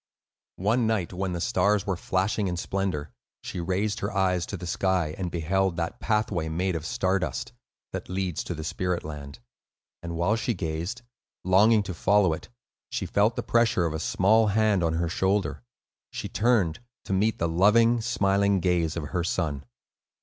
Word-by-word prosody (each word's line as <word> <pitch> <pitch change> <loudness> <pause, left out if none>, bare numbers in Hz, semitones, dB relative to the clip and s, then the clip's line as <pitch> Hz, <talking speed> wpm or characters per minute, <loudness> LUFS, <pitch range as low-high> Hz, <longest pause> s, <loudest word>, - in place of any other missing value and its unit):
One 110 +5 +1
night, 105 -6 -1
when 95 0 -2
the 85 - -3
stars 100 +4 +2
were 100 - 0
flashing 95 +3 0
in 90 -1 -2
splendor, 90 -6 -2 0.3
she - - -5
raised 95 +4 -1
her 100 - -2
eyes 95 -3 +1
to 100 - -5
the 90 - -7
sky, 90 -2 0
and 95 -3 -3
beheld 90 +2 0
that 85 +1 -3
pathway 105 -7 0
made 90 +3 -1
of 80 0 -4
star 95 +1 +1
dust, 80 -7 -4 0.4
that - - -5
leads 95 -3 -2
to 90 - -4
the 80 - -6
spirit 90 +2 -2
land. 70 -2 -8 0.6
And 85 0 -5
while 85 +6 +2
she 115 +1 -1
gazed, 85 +8 -4 0.4
longing 105 +4 +5
to 95 - -5
follow 95 0 +3
it, 80 - -8 0.4
she - - -3
felt 105 +3 +2
the 120 - -3
pressure 115 -7 +2
of 80 - -1
a 80 - -3
small 110 +7 +3
hand 105 -2 +2
on 80 -1 +1
her 85 +1 0
shoulder. 95 +4 0 0.5
She - - -5
turned, 105 -7 +1 0.3
to - - -2
meet 105 +4 +2
the 85 - 0
loving, 115 +7 +4
smiling 100 -4 +2
gaze 85 -2 +1
of 75 -3 -4
her 90 -2 -1
son. 75 -5 -2
95 Hz, 180 wpm, -26 LUFS, 85-105 Hz, 0.6 s, longing